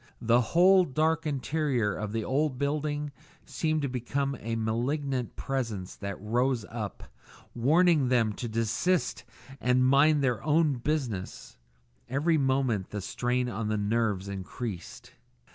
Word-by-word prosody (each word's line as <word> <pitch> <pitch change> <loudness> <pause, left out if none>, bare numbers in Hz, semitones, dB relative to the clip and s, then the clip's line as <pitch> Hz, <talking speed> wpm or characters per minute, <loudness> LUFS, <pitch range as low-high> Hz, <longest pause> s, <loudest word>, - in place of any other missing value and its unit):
The 115 +2 +4
whole 180 +9 +5
dark 160 +1 0
interior 140 -6 0
of 105 -1 -4
the 110 0 -2
old 140 +1 0
building 145 +1 -1 0.3
seemed 155 -2 -1
to - - +1
become 135 +2 -2
a 115 +1 -3
malignant 125 +3 -1
Presence 115 -9 -3
that 100 -2 -5
rose 120 +3 0
up, 110 -3 -5 0.5
warning 155 +3 +3
them 120 -4 +2
to 120 +3 -5
desist 115 - 0 0.4
and 125 +1 +3
mind 140 +2 +4
their 125 -4 0
own 150 -3 +2
business; 120 - -3 0.5
every 150 +5 +2
moment 130 -7 +1
the 105 - -4
strain 125 +5 -1
on 115 -2 -3
the 110 0 0
nerves 105 -2 0
increased. 100 +1 -6
125 Hz, 130 wpm, -28 LUFS, 110-145 Hz, 0.5 s, whole